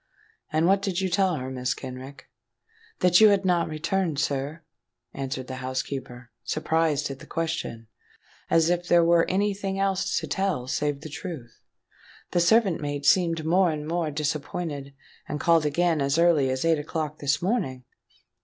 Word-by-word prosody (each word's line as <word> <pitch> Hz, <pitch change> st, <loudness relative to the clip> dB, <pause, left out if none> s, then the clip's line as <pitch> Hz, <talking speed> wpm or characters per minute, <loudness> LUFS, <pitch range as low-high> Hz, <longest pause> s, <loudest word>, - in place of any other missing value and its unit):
"And 155 Hz, +2 st, +2 dB
what 195 Hz, +2 st, +4 dB
did 195 Hz, -3 st, -1 dB
you 190 Hz, -1 st, 0 dB
tell 185 Hz, -1 st, +2 dB
her, 130 Hz, -2 st, -5 dB
Mrs. 125 Hz, 0 st, -2 dB
Kenrick?" 130 Hz, +1 st, -9 dB, 0.7 s
"That 180 Hz, +2 st, +5 dB
you 215 Hz, -, +9 dB
had 200 Hz, -1 st, +2 dB
not 175 Hz, -2 st, +2 dB
returned, 160 Hz, +1 st, -1 dB
sir," 145 Hz, +2 st, -2 dB, 0.5 s
answered 130 Hz, -1 st, -4 dB
the 130 Hz, 0 st, -7 dB
housekeeper, 130 Hz, -1 st, -5 dB
surprised 155 Hz, +1 st, 0 dB
at 135 Hz, -, -8 dB
the -, -, -13 dB
question, 160 Hz, -9 st, -3 dB, 0.6 s
as 165 Hz, +1 st, +4 dB
if 175 Hz, 0 st, -1 dB
there 170 Hz, -1 st, +5 dB
were 170 Hz, 0 st, +4 dB
any 200 Hz, +2 st, +1 dB
thing 195 Hz, -1 st, -4 dB
else 195 Hz, 0 st, 0 dB
to -, -, -5 dB
tell 190 Hz, -10 st, -1 dB
save 145 Hz, +1 st, -2 dB
the 155 Hz, -, -8 dB
truth. 150 Hz, -6 st, -8 dB, 0.7 s
"The 175 Hz, -, +2 dB
servant 190 Hz, 0 st, +3 dB
maid 145 Hz, -1 st, -3 dB
seemed 165 Hz, -1 st, +3 dB
more 180 Hz, +2 st, +3 dB
and 150 Hz, -1 st, -4 dB
more 165 Hz, -1 st, -1 dB
disappointed, 145 Hz, -1 st, -4 dB, 0.3 s
and 150 Hz, -, -3 dB
called 165 Hz, -2 st, +3 dB
again 165 Hz, +1 st, +1 dB
as 140 Hz, +2 st, +1 dB
early 165 Hz, -6 st, +4 dB
as 130 Hz, +3 st, -1 dB
eight 165 Hz, -2 st, +3 dB
o'clock 155 Hz, 0 st, -4 dB
this 145 Hz, 0 st, +1 dB
morning." 175 Hz, -, -1 dB
160 Hz, 165 wpm, -26 LUFS, 140-175 Hz, 0.7 s, you